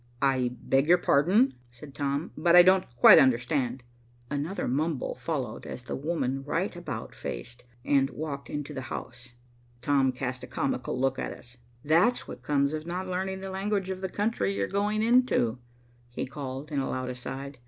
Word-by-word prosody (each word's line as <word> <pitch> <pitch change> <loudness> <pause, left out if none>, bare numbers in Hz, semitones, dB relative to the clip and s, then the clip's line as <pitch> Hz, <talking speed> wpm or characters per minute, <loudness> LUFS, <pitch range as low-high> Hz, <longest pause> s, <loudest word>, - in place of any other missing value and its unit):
"I 130 -2 +2
beg 135 +2 +1
your 175 +2 +6
pardon," 180 - +3 0.2
said 135 +4 -12
Tom, 140 +4 -2
"but 170 0 +3
I 175 - +10
don't 185 +1 +4
quite 120 - +9
understand." 125 0 +1 0.5
Another 150 +7 -2
mumble 145 +2 -1
followed, 135 -9 -4
as 125 - -7
the - - -4
woman 135 -3 -2
right 165 +7 -2
about 145 -10 -6
faced 120 - -7 0.2
and 135 -1 +3
walked 145 -2 -6
into 145 0 -5
the 135 - -4
house. 120 -1 -8 0.5
Tom 135 -1 +3
cast 130 0 -4
a - - -7
comical 130 -1 -2
look 135 0 +1
at - - -3
us. 125 0 -15 0.3
"That's 175 +11 +3
what - - -8
comes 140 0 +1
of 155 +1 -5
not 180 +2 -3
learning 190 +1 -3
the 195 0 -5
language 195 0 -1
of 185 0 -5
the 190 - -2
country 205 - -1
you're 100 0 0
going 210 +2 0
into," 230 - +3 0.5
he 120 - -4
called, 140 +1 -7
in 145 - 0
a 135 - -2
loud 130 0 -3
aside. 135 +2 -7
140 Hz, 175 wpm, -28 LUFS, 130-175 Hz, 0.5 s, I